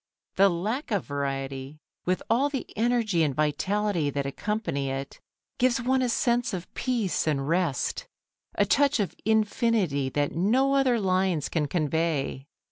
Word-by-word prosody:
The 195 +1 +6
lack 210 - -2
of 205 -6 0
variety, 135 0 -4 0.3
with 185 +1 0
all 255 +6 +2
the 275 -3 -3
energy 225 -5 +1
and 145 -4 +1
vitality 170 +3 0
that 140 0 -2
accompany 140 -3 -2
it, 135 +1 -5 0.4
gives 250 -1 +3
one 260 +2 +1
a 250 - +1
sense 240 -2 +1
of 180 -1 -8
peace 230 -10 -1
and 140 -3 0
rest, 165 -5 0 0.5
a - - +3
touch 285 -2 +3
of 200 - -1
infinity 215 - +1
that 145 +1 -1
no 250 +10 +2
other 260 -4 +3
lines 185 -5 +1
can 155 -3 0
convey. 155 -3 -1
185 Hz, 145 wpm, -27 LUFS, 145-230 Hz, 0.5 s, The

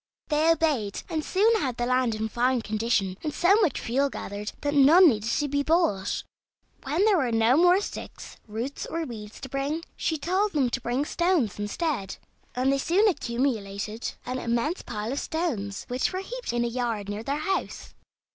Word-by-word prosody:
They 305 +1 +3
obeyed, 290 -12 0
and 315 -3 -2
soon 435 +6 +3
had 255 -4 -2
the 240 - 0
land 255 -2 +1
in 220 0 -2
fine 245 +1 +1
condition, 210 -3 0
and 305 - -2
so 350 +5 +3
much 335 - +1
fuel 275 +4 0
gathered 205 -4 -6
that 290 0 -1
none 305 +6 +7
need 215 -3 -1 0.2
be 285 0 +1
bought. 285 - +1 0.6
When 305 +8 +1
there 420 -3 +4
were 255 -5 0
no 225 +2 +4
more 355 +4 +5
sticks, - - -8
roots, 230 +6 -4
or 330 0 -3
weeds 220 -6 -8
to - - -6
bring; 280 +5 -2
she 320 - -1
told 375 +7 0
them 270 -5 +1
to 260 - -2
bring 250 +5 -1
stones 330 - +1
instead; 205 - -2 0.4
and 260 +2 +2
they 275 - 0
soon 375 +10 +3
accumulated 230 - -2
an 255 0 -3
immense 235 +10 -1
pile 215 0 -4
of 280 - -1
stones, 240 - -3
which 250 +1 0
were 370 +1 -3
heaped - - -5
in 240 0 0
a - - 0
yard 235 -4 -2
near 205 +1 -4
their 275 +5 -2
house. 380 +5 -3
260 Hz, 185 wpm, -26 LUFS, 225-325 Hz, 0.6 s, none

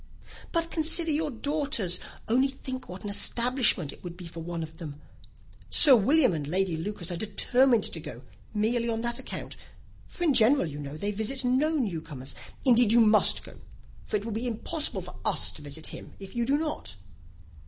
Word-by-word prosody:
"But 335 -1 0
consider 325 +1 +1
your 305 +1 0
daughters. 280 - -1 0.3
Only 255 +4 +3
think 260 -3 -7
what 180 +1 -9
an 205 - -4
establishment 235 - +2
it - - -17
would 175 -1 -8
be 180 - -9
for 165 0 -8
one 165 0 -5
of 160 0 -10
them. 150 -4 -8 0.7
Sir 285 -5 +8
William 255 - +4
and 150 -3 -4
Lady 185 +1 0
Lucas 175 +1 -4
are 175 - -3
determined 240 +3 +2
to 165 - 0
go, 150 -6 -9 0.3
merely 230 +2 0
on 225 0 -1
that 235 0 -2
account; - - -6 0.5
for 350 - -6
in 315 -5 +3
general, 250 0 +5
you 145 -2 -7
know, 145 +1 -7
they 205 +6 -2
visit 220 +6 -2
no 260 +5 +2
new 225 - -1
comers. 140 -5 -9 0.3
Indeed 240 -3 +5
you 235 - +6
must 220 -1 +5
go, - - -13 0.5
for - - 0
it 205 - -7
will 230 - -4
be 225 +4 -2
impossible 285 +7 -1
for - - -10
us - - +1
to - - -10
visit 145 +2 -6
him, - - -9
if 195 +1 -10
you 235 -1 -1
do 280 +2 +3
not." 300 - -3
220 Hz, 195 wpm, -27 LUFS, 175-265 Hz, 0.7 s, Sir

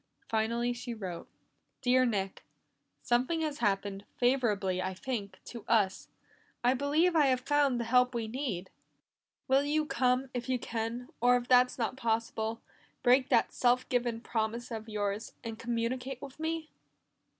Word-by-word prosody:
Finally 235 +2 0
she 240 0 -6
wrote. 185 -6 -6 0.6
"Dear 255 0 +4
Nick 195 -4 -2 0.6
"Something 255 +7 +1
has 305 -2 -2
happened, 200 0 0
favorable, 240 -6 +2
I 185 0 -3
think, 200 -3 -4
to 235 -3 -8
us. 205 -5 +2 0.5
I 245 +1 +5
believe 300 +6 +2
I 300 -3 +5
have 255 -1 +2
found 280 -2 +2
the - - 0
help 250 +2 +3
we 230 -2 -1
need. 220 -7 -4 0.8
"Will 270 +1 +4
you 305 +1 +1
come 255 -1 +1
if 245 +1 -4
you 255 - +2
can, 235 +2 -4
or 245 +1 +5
if 245 0 -5
that's 250 0 +5
not 245 +1 -2
possible, 225 -1 -1 0.4
break 255 +1 +4
that - - +3
self 250 0 +2
given 240 -2 0
promise 235 +1 -2
of 220 -1 -5
yours, 205 +1 -2
and 225 -1 -6
communicate 240 +2 -2
with 275 +1 -10
me? 320 0 -3
245 Hz, 150 wpm, -31 LUFS, 225-260 Hz, 0.8 s, I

